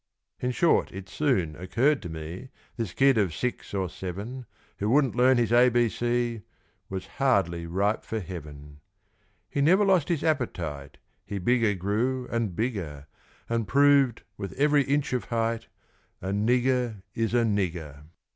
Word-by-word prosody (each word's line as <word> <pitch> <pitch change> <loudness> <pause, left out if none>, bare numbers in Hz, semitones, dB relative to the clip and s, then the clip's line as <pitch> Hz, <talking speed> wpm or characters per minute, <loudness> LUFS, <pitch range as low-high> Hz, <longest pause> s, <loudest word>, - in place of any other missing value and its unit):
In 125 - -1
short, 140 +7 +2
it 95 0 -8
soon 95 - 0
occurred 120 - +1
to 90 - -6
me 80 +10 -7 0.3
This 115 -6 -3
kid 135 +2 +4
of 95 -6 0
six 125 -1 -3
or 95 -2 -1
seven, 105 +9 -6 0.3
Who 105 - 0
wouldn't 135 0 +3
learn 125 +1 +5
his 115 -2 +1
A 125 +1 +6
B 120 -1 +2
C, 120 -1 -1 0.5
Was 95 -1 -4 0.2
hardly 90 -10 +2
ripe 100 +5 0
for 110 - -3
heaven. 75 -6 -9 0.7
He 140 - -2
never 185 +8 +5
lost 185 -6 +3
his 170 -4 0
appetite 85 - -2 0.3
He 100 - -5
bigger 110 +1 +2
grew, 115 +7 -1
and 115 -6 -1
bigger; 90 - -3 0.4
And 115 -2 -1
proved, 140 -1 +4
with 100 -2 -5
every 145 +1 +3
inch 140 0 0
of 125 - -1
height, 115 0 -1 0.5
A 95 - -5
nigger 120 +1 +1
is 115 0 -1
a 120 - +4
nigger. 85 -9 -2
115 Hz, 155 wpm, -27 LUFS, 95-125 Hz, 0.7 s, A